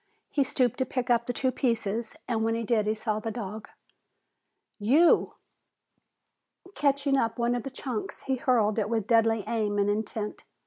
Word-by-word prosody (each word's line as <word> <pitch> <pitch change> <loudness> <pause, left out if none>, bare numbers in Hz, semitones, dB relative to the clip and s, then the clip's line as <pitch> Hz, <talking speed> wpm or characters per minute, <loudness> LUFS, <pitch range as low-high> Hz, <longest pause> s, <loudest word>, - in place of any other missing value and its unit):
He 285 - +2
stooped 255 -3 0
to 260 - +2
pick 250 -1 -1
up 235 0 +2
the - - 0
two 260 +1 0
pieces 230 -3 -1
and 225 -3 0
when 225 0 +1
he 230 - -2
did 215 -1 +1
he 215 - +1
saw 215 -1 -2
the 225 - -4
dog. 215 -1 -6 1.1
"You!" 280 +12 +4 1.4
Catching 280 -2 +2
up 230 -2 0
one 240 0 +1
of 245 - -1
the 270 - -6
chunks, 255 -4 -5
he 265 -1 -1
hurled 230 -4 +2
it 210 0 -1
with 225 -3 0
deadly 225 -1 +3
aim 215 -3 -1
and 205 0 +2
intent. 210 0 -4
230 Hz, 175 wpm, -28 LUFS, 215-255 Hz, 1.4 s, You